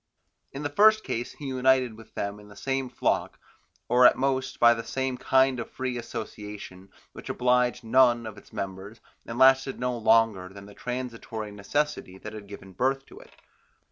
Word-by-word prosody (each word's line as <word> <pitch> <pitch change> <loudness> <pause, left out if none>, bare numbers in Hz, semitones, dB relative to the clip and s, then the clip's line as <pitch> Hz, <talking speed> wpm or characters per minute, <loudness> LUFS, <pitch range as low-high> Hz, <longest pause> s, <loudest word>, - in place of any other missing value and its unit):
In 140 +2 -6
the 145 - -1
first 215 +7 +5
case 120 +1 -4
he 145 - -10
united 130 -2 +2
with 115 0 -16
them 100 +1 -3
in 105 - -15
the 100 - -14
same 135 +3 -2
flock, 125 - -1 0.5
or 125 0 +7
at - - +3
most 130 0 -1
by 120 -1 +5
some 130 +2 -2
kind 130 -1 +3
of 120 - -5
free 130 -1 -4
association 105 -5 -7 0.2
which - - -10
obliged 125 0 +1
none 120 0 +4
of 110 -2 -7
its - - -16
members, 100 +3 -6 0.3
and 115 - -5
lasted 135 +1 +4
no 125 0 -1
longer 110 -5 +3
than 100 +1 -12
the 100 - -13
transitory 115 -4 -5
necessity 105 -1 -2
that 105 +2 -9
had 105 -2 -9
given 100 -1 -11
birth 135 +6 0
to - - -14
it. - - -16
120 Hz, 175 wpm, -27 LUFS, 105-130 Hz, 0.5 s, or